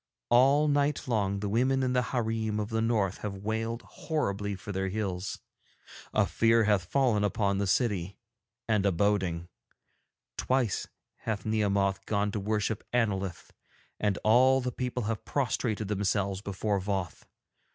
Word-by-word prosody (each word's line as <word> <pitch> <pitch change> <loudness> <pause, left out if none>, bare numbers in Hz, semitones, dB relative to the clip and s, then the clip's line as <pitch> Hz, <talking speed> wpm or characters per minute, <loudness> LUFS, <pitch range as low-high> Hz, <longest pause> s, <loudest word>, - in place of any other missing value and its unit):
All 135 +5 +5
night 145 -1 +1
long 100 -4 0
the 105 - -1
women 130 +5 +2
in 130 0 +1
the 125 - +3
hareem 110 -3 -1
of 105 0 -2
the 110 -1 0
North 110 -5 +1
have 105 -2 -4
wailed 110 +3 -3
horribly 105 - -2
for 105 +2 -8
their 95 0 -1
hills. 95 -2 -3 0.7
A - - +3
fear 115 0 +3
hath 105 -4 +2
fallen 120 -1 +2
upon 100 -1 +1
the 100 - 0
city, 100 -4 0 0.5
and 105 -3 +2
a - - +3
boding. 90 -3 0 0.9
Twice 125 -5 0 0.3
hath 105 -3 -4
Nehemoth 100 -3 +1
gone 105 -1 +1
to 105 - -2
worship 105 +1 -1
Annolith, 100 -7 -1 0.5
and 105 -4 +1
all 130 +4 +5
the 125 -1 -2
people 125 0 -3
have 110 0 -3
prostrated 115 -5 -1
themselves 100 -1 0
before 100 0 -1
Voth. 95 -2 -3
105 Hz, 145 wpm, -29 LUFS, 100-115 Hz, 0.9 s, All